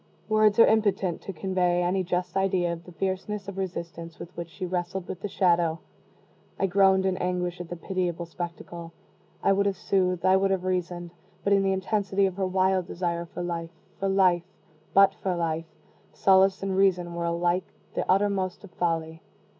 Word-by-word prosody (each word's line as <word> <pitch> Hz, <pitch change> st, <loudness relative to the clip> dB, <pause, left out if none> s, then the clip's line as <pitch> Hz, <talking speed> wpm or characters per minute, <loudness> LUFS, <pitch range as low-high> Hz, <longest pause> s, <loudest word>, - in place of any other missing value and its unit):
Words 215 Hz, 0 st, +4 dB
are 230 Hz, -, +9 dB
impotent 200 Hz, -5 st, +1 dB
to -, -, -6 dB
convey 180 Hz, 0 st, 0 dB
any 185 Hz, +2 st, +1 dB
just 180 Hz, 0 st, -2 dB
idea 185 Hz, -3 st, +1 dB
of 170 Hz, 0 st, -9 dB
the 180 Hz, -, -11 dB
fierceness 195 Hz, +3 st, -3 dB
of 200 Hz, -, -6 dB
resistance 170 Hz, -3 st, -5 dB
with 175 Hz, +2 st, -10 dB
which 170 Hz, -1 st, -6 dB
she 185 Hz, +3 st, -6 dB
wrestled 180 Hz, +1 st, -3 dB
with 180 Hz, -, -6 dB
the -, -, -2 dB
Shadow. 170 Hz, -4 st, +2 dB, 0.8 s
I -, -, +2 dB
groaned 190 Hz, 0 st, +4 dB
in 190 Hz, -1 st, +1 dB
anguish 180 Hz, -1 st, -2 dB
at 175 Hz, -, -8 dB
the 175 Hz, -, -4 dB
pitiable 175 Hz, -1 st, -2 dB
spectacle. 170 Hz, 0 st, -7 dB, 0.5 s
I 195 Hz, -, +4 dB
would 200 Hz, +1 st, +2 dB
have 195 Hz, -2 st, -1 dB
soothed 185 Hz, -2 st, 0 dB
I 185 Hz, 0 st, +6 dB
would 195 Hz, 0 st, +2 dB
have 190 Hz, -2 st, 0 dB
reasoned; 175 Hz, -2 st, -2 dB, 0.3 s
but 200 Hz, -, +3 dB
in 195 Hz, -, +4 dB
the 195 Hz, 0 st, +2 dB
intensity 195 Hz, 0 st, +1 dB
of 190 Hz, -1 st, -2 dB
her 190 Hz, -1 st, 0 dB
wild 185 Hz, -1 st, +1 dB
desire 170 Hz, -1 st, -2 dB
for 175 Hz, -, -6 dB
life 170 Hz, -1 st, -3 dB, 0.3 s
for 195 Hz, -, 0 dB
life 185 Hz, -3 st, +4 dB, 0.5 s
but 195 Hz, 0 st, +6 dB
for 185 Hz, -2 st, -2 dB
life 165 Hz, -1 st, -1 dB, 0.5 s
solace 190 Hz, 0 st, +4 dB
and 195 Hz, -1 st, -1 dB
reason 180 Hz, -3 st, +2 dB
were 170 Hz, 0 st, -3 dB
alike 175 Hz, +2 st, +1 dB, 0.3 s
the -, -, -3 dB
uttermost 190 Hz, -1 st, +1 dB
of 200 Hz, -, -12 dB
folly. 165 Hz, -2 st, -2 dB
185 Hz, 185 wpm, -27 LUFS, 175-195 Hz, 0.8 s, are